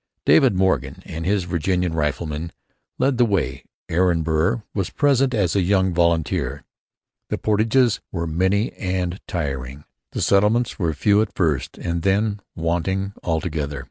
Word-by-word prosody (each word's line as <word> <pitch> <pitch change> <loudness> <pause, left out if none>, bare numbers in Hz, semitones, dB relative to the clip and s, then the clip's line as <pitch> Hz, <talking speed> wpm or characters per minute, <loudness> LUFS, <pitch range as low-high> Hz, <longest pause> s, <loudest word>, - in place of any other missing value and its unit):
Daniel - - +6
Morgan 90 -8 0
and 80 +1 -5
his 100 -1 +2
Virginian 90 0 -1
riflemen 75 +1 -2 0.5
led 130 -1 +1
the - - +6
way. 75 - -1 0.2
Aaron 85 -1 +2
Burr 80 +7 +1
was 95 -3 -1
present 135 -3 +2
as 95 -6 +1
a 100 - +3
young 95 0 +2
volunteer. 85 -2 0 0.7
The - - -1
portages 110 +3 +2
were 85 -2 -2
many 95 +7 +1
and 90 -1 -2
trying. 70 -5 -4 0.3
The - - -2
settlements 105 +5 +2
were 85 -4 +1
few 100 +8 +3
at 110 - -3
first 80 -8 0
and 85 -1 -2
then 100 +3 +1 0.2
wanting 90 +4 -1
altogether. 80 -4 -2
90 Hz, 140 wpm, -22 LUFS, 80-100 Hz, 0.7 s, Daniel